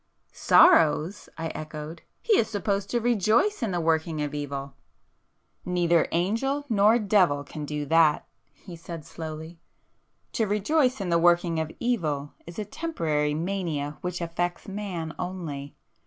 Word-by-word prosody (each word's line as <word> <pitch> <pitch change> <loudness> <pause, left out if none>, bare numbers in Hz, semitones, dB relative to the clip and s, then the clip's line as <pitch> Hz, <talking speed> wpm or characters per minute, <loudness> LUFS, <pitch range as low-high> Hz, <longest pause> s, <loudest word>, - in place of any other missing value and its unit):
"Sorrows!" 160 +5 +4
I 165 0 -3
echoed—"He 155 - -5
is 220 - +3
supposed 200 -2 -1
to 240 - +1
rejoice 235 - +2
in 230 - 0
the 175 -2 -1
working 160 -1 0
of 145 0 -4
evil!" 140 -2 -5 0.9
"Neither 175 -2 +2
angel 230 - 0
nor 215 +1 +5
devil 190 -10 +2
can 150 +1 -7
do 150 0 -3
that,"—he 165 +3 0
said 165 -2 -8
slowly—"To 160 +7 -8
rejoice 250 +5 +1
in 185 - -3
the 170 0 +3
working 175 -1 +3
of 160 0 -3
evil 155 -12 -1
is 170 - -10
a 215 - -3
temporary 155 - -1
mania 160 -4 -3
which 180 0 -4
affects 175 +1 -3
man 190 -5 -5
only. 165 -6 -5
170 Hz, 130 wpm, -26 LUFS, 155-205 Hz, 0.9 s, nor